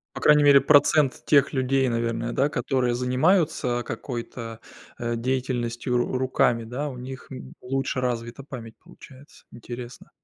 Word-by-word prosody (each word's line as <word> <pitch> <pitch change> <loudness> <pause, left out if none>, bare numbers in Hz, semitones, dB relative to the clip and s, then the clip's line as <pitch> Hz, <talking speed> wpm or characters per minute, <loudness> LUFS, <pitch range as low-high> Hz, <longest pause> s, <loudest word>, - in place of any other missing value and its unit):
По - - -5
крайней 150 -1 +5
мере 140 -1 +7
процент 145 0 +3
тех 145 0 +4
людей, 130 0 +1
наверное, 115 0 -2
да, 140 +2 +2
которые 125 -2 0
занимаются 125 0 +1
какой-то, 115 -1 -6 0.4
э, 120 0 -2
деятельностью 125 -1 -2
ру 120 +1 -1
руками, 125 -2 +1
да, 135 +6 -4
у 130 - -8
них 130 +1 -8
н 65 0 -9
лучше 135 0 -2
развита 120 +1 -3
память 115 -5 -9
получается, 145 -5 -17
интересно. 120 +1 -9
125 Hz, 140 wpm, -25 LUFS, 120-135 Hz, 0.4 s, мере